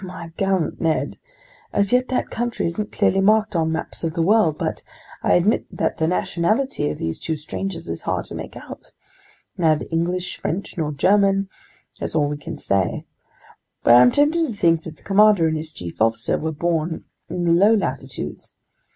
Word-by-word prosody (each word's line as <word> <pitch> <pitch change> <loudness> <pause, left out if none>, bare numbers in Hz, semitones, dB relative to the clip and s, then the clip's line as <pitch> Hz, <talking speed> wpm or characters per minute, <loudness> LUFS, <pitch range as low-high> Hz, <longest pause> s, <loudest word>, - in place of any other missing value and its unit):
"My 175 -3 -8
gallant 190 -4 0
Ned, 160 -2 0 0.5
as 200 +2 +1
yet 250 +1 +3
that 255 - -2
country 240 0 -2
isn't 205 +5 -3
clearly 195 - +2
marked 215 0 +3
on 160 -1 +1
maps 160 - -5
of 165 -1 -2
the 165 - +1
world, 180 -5 +3
but - - -3 0.4
I - - +2
admit 195 +6 +2
that - - -2
the 160 - +2
nationality 180 - 0
of 75 - -4
these 80 0 -3
two 160 - -2
strangers 170 - -5
is 85 0 -5
hard - - -2
to - - -10
make - - -7
out! - - -11 0.7
Neither 160 -3 +2
English, 175 +2 -1
French, 185 +5 -3
nor 155 -3 -2
German, 195 +5 +2 0.5
that's - - -4
all 150 -2 +3
we 145 - -3
can 145 - -7
say. 95 -3 -1 0.8
But 120 - +6
I'm 125 +1 +8
tempted 315 +3 +2
to 240 - -4
think 165 -4 +2
that 160 -2 -8
the - - -25
commander 205 -4 +5
and 160 - 0
his 155 0 -4
chief 85 - -8
officer 115 +1 +1
were 160 +1 -2
born 160 +1 -2 0.2
in 175 - -3
the 170 - +2
low 200 +6 +5
latitudes. 205 - -4
170 Hz, 185 wpm, -22 LUFS, 155-200 Hz, 0.8 s, I'm